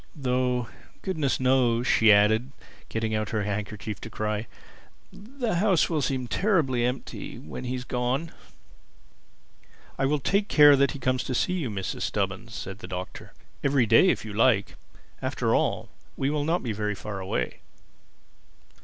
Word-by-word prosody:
Though 125 -3 0 0.4
goodness 155 -8 -1
knows," 125 -2 +2
she 110 -4 +5
added, 110 +5 +4 0.4
getting 110 -1 -2
out 110 -1 -1
her 110 -2 -1
handkerchief 105 0 -4
to - - -7
cry, 110 0 -3 0.7
"the 235 -2 -3
house 190 -3 +3
will 155 -3 +1
seem 130 -2 -1
terribly 150 - +1
empty 125 +2 -4
when 80 +11 -8
he's 125 0 -3
gone." 125 +6 -2 1.7
"I 135 - +2
will 150 +2 +2
take 200 +9 +1
care 145 -5 +7
that 140 +2 +2
he - - -6
comes 130 -1 0
to 130 - -2
see 180 - +1
you, 165 -9 -2
Mrs. 95 -3 -4
Stubbins," 105 +3 -2
said 95 +1 -6
the 90 - -9
Doctor—"every 115 +8 -3
day, 115 - +6
if - - 0
you 105 - -7
like. 110 -2 +3 0.5
After - - 0
all, - - 0 0.3
he 135 +1 0
will 150 -1 -1
not 170 +3 0
be 120 - -2
very 105 0 -2
far 100 0 -6
away." 95 0 -3
125 Hz, 155 wpm, -26 LUFS, 110-140 Hz, 1.7 s, care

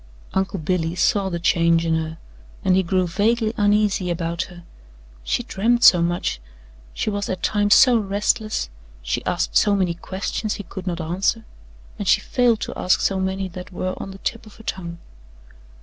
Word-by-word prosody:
Uncle 190 +1 0
Billy 165 0 -1
saw 195 +1 +2
the 170 - -2
change 170 -1 +2
in 165 - +1
her 160 0 -2 0.5
and 185 - +4
he 190 - +4
grew 185 +1 +1
vaguely 215 +5 +1
uneasy 205 -3 +2
about 170 0 -2
her 175 -2 -13 0.6
she - - -1
dreamed 235 +5 +1
so 175 - +8
much, 170 - -1 0.5
she 215 - -2
was 205 0 -3
at 185 - -4
times 205 -1 +3
so 245 -3 +6
restless, 210 - -1 0.3
she - - -2
asked - - -1
so 205 -1 +4
many 185 -3 +1
questions 195 +4 -3
he 205 - -6
could 190 +1 -9
not 175 -1 -2
answer, 190 +7 -1 0.5
and - - -3
she - - +5
failed 240 -3 +2
to - - -4
ask 180 - +2
so 195 -1 0
many 190 0 -1
that 180 +1 -9
were 185 0 -3
on - - -6
the 195 - -9
tip 225 +3 -4
of 210 - -15
her 225 - -14
tongue. 170 -5 -5
190 Hz, 180 wpm, -22 LUFS, 170-205 Hz, 0.6 s, so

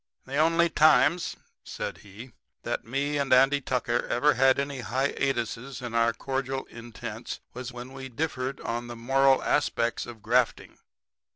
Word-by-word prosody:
"The 135 +2 -4
only 165 +2 +4
times," 165 +2 +4 0.3
said - - -5
he, 105 +5 -12 0.3
"that - - -2
me 140 +4 -1
and 140 -1 -1
Andy 135 +2 +5
Tucker 125 -2 -1
ever 145 +5 +3
had 130 +1 +4
any 140 -1 -2
hiatuses 130 0 -2
in 120 -2 -6
our 115 0 +3
cordial 135 +3 -3
intents 115 -1 -7
was 125 +1 -6
when 125 +1 -9
we 135 0 -7
differed 135 0 -3
on 120 +1 -3
the 120 - -7
moral 135 +3 +3
aspects 120 -5 0
of 115 -3 -11
grafting. 120 +1 0
130 Hz, 150 wpm, -27 LUFS, 120-135 Hz, 0.3 s, Andy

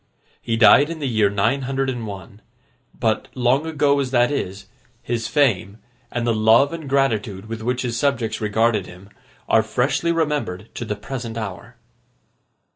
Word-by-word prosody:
He 115 - -1
died 120 +7 +6
in 165 - -5
the 150 - -4
year 110 -4 +2
nine 105 +7 +1
hundred 135 +1 -2
and 120 -4 -3
one; 100 +1 -9 0.5
but, 110 -3 -1
long 130 +5 +1
ago 145 -2 +2
as 135 -2 -1
that 120 0 +2
is, 100 -8 -4 0.4
his 115 -2 -2
fame, 110 -6 +1 0.3
and 120 -1 -3
the 120 - +2
love 110 +7 +4
and 160 -4 -6
gratitude 110 -8 0
with 115 0 -6
which 125 +3 -1
his 120 -2 -2
subjects 125 -7 -1
regarded 110 -1 +1
him, 90 +3 -13 0.4
are 110 - +4
freshly 135 +9 0
remembered 150 - -2
to 120 - -5
the 105 - -3
present 120 0 -6
hour. 115 +3 -7
115 Hz, 165 wpm, -21 LUFS, 110-135 Hz, 0.5 s, died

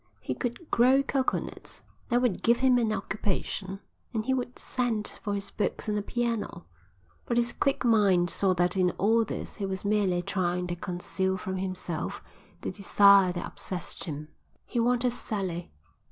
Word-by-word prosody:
He 130 - -3
could 245 - -5
grow 260 +3 +5
coconuts; 270 -1 -2 0.3
that 245 0 +2
would 235 -7 +1
give 235 +1 +3
him 255 -2 +5
an 225 -2 +1
occupation; 195 -1 -3 0.3
and 215 -1 0
he 265 - +2
would 250 -1 -3
send 235 -4 -2
for 205 -2 -2
his 200 0 -4
books 210 - -2
and 210 - 0
a 210 - 0
piano; 230 -5 -2 0.6
but 235 - 0
his 240 0 +2
quick 275 -2 0
mind 195 -7 +4
saw 185 +1 +2
that 175 +1 +2
in 185 -1 +3
all 225 +3 +4
this 215 - -6
he 200 - -2
was 190 +1 -4
merely 200 -4 +2
trying 180 -1 -1
to 175 -1 -3
conceal 190 +1 -1
from 190 0 -4
himself 185 -3 -3 0.4
the - - -3
desire 200 -1 +6
which 175 - -4
obsessed 180 -4 -5
him. 150 -1 -6 0.4
He 240 - -2
wanted 245 +1 +2
Sally. 190 -7 -3
200 Hz, 170 wpm, -28 LUFS, 185-235 Hz, 0.6 s, desire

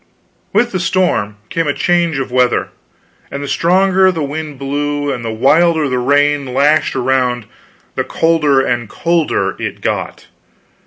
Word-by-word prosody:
With 235 +4 +1
the 185 - -2
storm 175 - 0
came 165 -2 -1
a 145 - 0
change 170 -4 +1
of 135 -2 -4
weather; 125 -1 +1 0.6
and 140 0 -5
the - - -5
stronger 190 +4 +3
the 165 -4 -3
wind 150 0 -5
blew, 145 +1 -2
and 120 - -6
the 115 - -3
wilder 155 +7 +3
the 130 -2 -1
rain 145 0 +1
lashed 145 +3 +2
around, 125 -2 0 0.5
the - - -1
colder 155 -5 +2
and 120 -3 -2
colder 170 +2 0
it - - -4
got. - - -3
145 Hz, 150 wpm, -15 LUFS, 130-165 Hz, 0.6 s, stronger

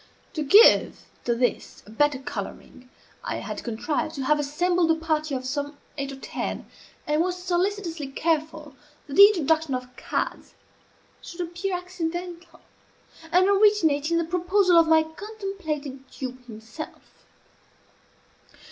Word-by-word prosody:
To 315 - -3
give 405 - +6 0.2
to 235 - +1
this 240 -2 -2
a 210 - -14
better 295 +4 +2
coloring, 255 -1 -8 0.3
I - - -3
had - - -6
contrived 290 +7 -2
to 275 - -3
have 300 +2 +3
assembled 335 +4 +1
a 325 - +4
party 310 -2 -1
of 255 0 -4
some 285 +2 -3 0.2
eight 275 -1 -4
or - - -7
ten, 270 - -5 0.4
and 300 +1 +1
was 360 +1 -1
solicitously 360 -3 -2
careful 310 0 -2 0.3
that 280 - -9
the 400 +6 +10
introduction 320 -7 +1
of 250 0 -7
cards - - -4 0.7
should 345 - -8
appear 350 +2 -3
accidental, 350 -1 -6 0.7
and 365 +2 +5
originate 390 -8 +3
in 335 - +2
the 335 - +1
proposal 360 +2 +2
of 330 - +4
my 320 0 +5
contemplated 320 -7 -6
dupe 255 -1 -7
himself. 225 +7 -11
320 Hz, 135 wpm, -25 LUFS, 280-360 Hz, 0.7 s, the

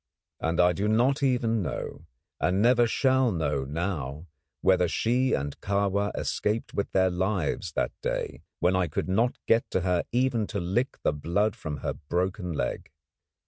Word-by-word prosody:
And 80 +1 -1
I 90 0 +5
do 100 +4 -1
not 125 +6 +3
even 120 -5 +2
know, 90 - -5 0.3
and 90 +5 +1
never 120 +2 +5
shall 130 0 +3
know 75 -6 -1
now, 75 -1 -3 0.4
whether 95 -2 +4
she 125 +8 +1
and 70 0 -2
Kahwa 100 0 +1
escaped 110 +2 -1
with 100 - -2
their 95 -1 +3
lives 90 -2 -1
that - - 0
day, - - -3 0.2
when 90 +2 +3
I 95 -2 +2
could 75 - -3
not 115 +7 +1
get 115 +1 +2
to 95 - 0
her 90 -1 +1
even 120 -3 +1
to 105 - -3
lick 100 +9 -1
the - - +2
blood 95 +8 0
from 75 -2 -5
her - - 0
broken 90 +4 -2
leg. 65 -6 -3
95 Hz, 165 wpm, -27 LUFS, 85-115 Hz, 0.4 s, I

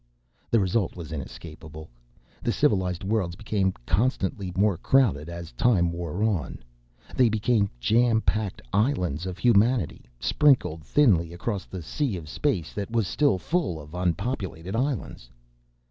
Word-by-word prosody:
The 115 - +4
result 95 0 0
was 85 -3 -8
inescapable. 80 +1 -8 0.5
The - - 0
civilized 90 -3 +1
worlds 95 -4 -1
became 100 -2 0
constantly 100 -2 0
more 100 0 +3
crowded 85 - +2
as 85 -1 -7
time 85 - +2
wore 85 +3 -3
on. 90 - -1 0.5
They 125 -3 +4
became 110 -1 +1
jampacked 110 - +1
islands 95 - 0
of 90 -1 -5
humanity 115 - +2
sprinkled 120 - +2
thinly 85 - +3
across 95 +1 -3
the 95 -3 -7
sea 125 - -2
of 80 -3 -9
space 90 - -1
that 100 -2 -4
was 115 -2 +1
still 145 -3 +2
full 145 - -1
of 75 +1 -12
unpopulated 90 0 -2
islands. 125 - -2
95 Hz, 130 wpm, -26 LUFS, 85-115 Hz, 0.5 s, The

